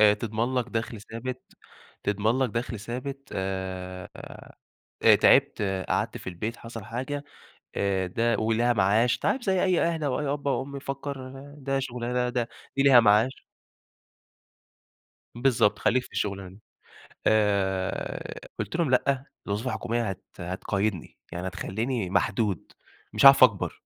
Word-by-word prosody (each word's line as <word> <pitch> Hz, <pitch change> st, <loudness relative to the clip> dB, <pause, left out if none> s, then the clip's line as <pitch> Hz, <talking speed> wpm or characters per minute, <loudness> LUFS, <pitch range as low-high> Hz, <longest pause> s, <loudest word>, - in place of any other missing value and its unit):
آآ 105 Hz, -1 st, +7 dB
تضمن 115 Hz, +3 st, -2 dB
لك 125 Hz, -2 st, 0 dB
دَخل 115 Hz, -1 st, -3 dB
ثابت، 120 Hz, +4 st, -6 dB, 0.6 s
تضمن 105 Hz, +4 st, +1 dB
لك 130 Hz, -3 st, +1 dB
دَخل 115 Hz, -1 st, -3 dB
ثابت 130 Hz, +5 st, -6 dB
آآ 95 Hz, -1 st, -4 dB, 1.0 s
آآ -, -, +8 dB
تعبت، -, -, +4 dB, 0.3 s
قعدت -, -, 0 dB
في -, -, -11 dB
البيت، 105 Hz, +6 st, -4 dB
حصل 115 Hz, -2 st, -8 dB
حاجة، 130 Hz, +6 st, -4 dB, 0.5 s
آآ 95 Hz, -2 st, +1 dB
ده 115 Hz, +6 st, +1 dB
وليها 115 Hz, +2 st, +2 dB
معاش، 110 Hz, +3 st, +3 dB
أنت -, -, -8 dB
عارف 265 Hz, -, +1 dB
زي 190 Hz, -4 st, +1 dB
أي 185 Hz, -2 st, +3 dB
أهل 165 Hz, -2 st, 0 dB
أو 140 Hz, -1 st, 0 dB
أي 150 Hz, -, -2 dB
أب 145 Hz, 0 st, -3 dB
أو 135 Hz, -, +1 dB
أم 140 Hz, +1 st, -8 dB
يفكر 140 Hz, -1 st, -5 dB, 0.3 s
ده 135 Hz, -1 st, -1 dB
شغلانة 125 Hz, -1 st, -2 dB
د -, -, -13 dB
ده 120 Hz, -2 st, -1 dB, 0.3 s
دي 135 Hz, -, +3 dB
ليها 135 Hz, -3 st, +8 dB
معاش 110 Hz, +4 st, +3 dB, 1.9 s
بالضبط، 120 Hz, -4 st, +2 dB
خلّيك 130 Hz, +1 st, +2 dB
في -, -, -15 dB
الشغلانة 100 Hz, -2 st, -2 dB
دي. 95 Hz, +3 st, -15 dB, 0.7 s
آآ 100 Hz, -3 st, 0 dB
قُلت -, -, -3 dB
لهم 170 Hz, -4 st, +1 dB
:"لأ، 130 Hz, +1 st, +2 dB, 0.2 s
الوظيفة 105 Hz, +5 st, -2 dB
الحكومية 120 Hz, -3 st, -1 dB
هت 95 Hz, -, -6 dB, 0.2 s
هتقيدني، 95 Hz, +1 st, -2 dB
يعني 85 Hz, +2 st, -4 dB
هتخلّيني 105 Hz, +3 st, -2 dB
محدود، 100 Hz, -1 st, 0 dB, 0.4 s
مش -, -, +3 dB
هاعرف 135 Hz, -1 st, +10 dB
أكبر." 100 Hz, -7 st, +3 dB
115 Hz, 145 wpm, -27 LUFS, 100-130 Hz, 1.9 s, هاعرف